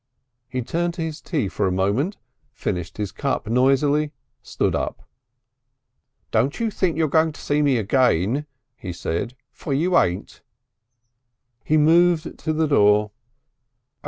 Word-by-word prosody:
He 125 -1 -3
turned 170 +6 -2
to 170 - -3
his 160 -1 -5
tea 145 - -1
for 100 +1 -1
a - - 0
moment, 100 - 0 0.4
finished 90 -7 -4
his 105 -3 -3
cup 140 -4 -2
noisily, 135 +5 +2 0.3
stood - - -1
up. - - -4 1.2
"Don't 125 +7 +1
you 230 -2 0
think 180 -6 0
you're 160 -1 +2
going 160 +2 +2
to - - -13
see 145 +1 0
me 140 -4 +3
again," 120 - +1 0.3
he 95 -6 -7
said, 85 +8 -3 0.2
"for 140 - -4
you 175 +5 +1
ain't." 90 +1 -2 1.2
He 155 - +2
moved 165 +2 +3
to 155 - -2
the 160 +1 +1
door. 105 -6 +4
140 Hz, 140 wpm, -22 LUFS, 105-160 Hz, 1.2 s, door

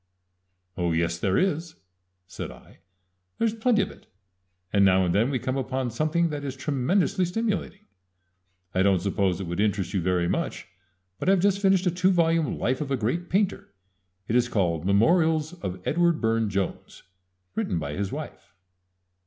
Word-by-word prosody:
"Oh, 85 -1 0
yes, 85 +1 0
there 95 +2 +1
is," 170 -3 0 0.5
said 90 - -7
I. - - -15 0.6
"There's 225 -1 +1
plenty 225 -2 +2
of 205 - -6
it, - - -18 0.7
and 100 -1 +4
now 95 -1 +4
and 85 - 0
then 115 +6 +2
we 135 - 0
come 130 +2 -2
upon 130 -1 -2
something 155 +7 +1
that 145 -2 -4
is 135 -2 -4
tremendously 160 +8 +1
stimulating. 210 +2 -2 0.9
I 95 - +2
don't 95 -1 +4
suppose 95 -2 0
it 95 - -4
would 85 +1 -4
interest 100 -2 0
you 95 - +1
very 90 0 +1
much, - - -2 0.5
but - - 0
I - - +7
have 195 - +3
just 200 +1 +2
finished 195 -2 +3
a 180 - +3
two 180 +2 +2
volume 165 -4 +2
life 130 +3 -1
of 145 - -3
a 135 - 0
great 145 +11 -2
painter 195 - -1 0.5
it 115 - 0
is 125 0 +3
called 85 -6 0
'Memorials 160 - +3
of 90 0 -4
Edward 170 0 +2
Burne 115 -1 +1
Jones,' 100 -1 -4 0.5
written 90 - -1
by 75 -3 -3
his 100 +3 -3
wife." - - -8
130 Hz, 175 wpm, -26 LUFS, -, 0.9 s, I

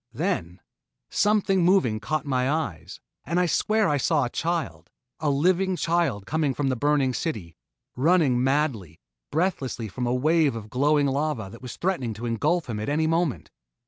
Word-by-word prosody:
Then 85 +3 -2 0.5
something 205 -3 +2
moving 155 - +3
caught 140 +7 -2
my 130 -2 0
eyes, 100 - -3 0.2
and 170 +5 0
I 180 - +3
swear 215 +5 +1
I 145 - +2
saw 145 +1 +2
a 120 - -5
child 145 - -3 0.3
a 150 - 0
living 180 +6 +2
child 165 - 0
coming 150 -2 0
from 145 -2 0
the 130 - 0
burning 140 0 +1
city 110 - -4 0.4
running 140 -3 +3
madly, 130 - -1 0.3
breathlessly 145 -8 -1
from 120 +5 -4
a 120 - +1
wave 155 0 +2
of 110 -2 -8
glowing 145 +3 +2
lava 140 -6 -1
that 120 +3 -9
threatened 130 - -2
to 115 +3 -6
engulf 150 +9 0
him 110 -3 -4
at 105 - -3
any 155 +2 +1
moment. 165 -4 -1
145 Hz, 165 wpm, -25 LUFS, 120-165 Hz, 0.5 s, moving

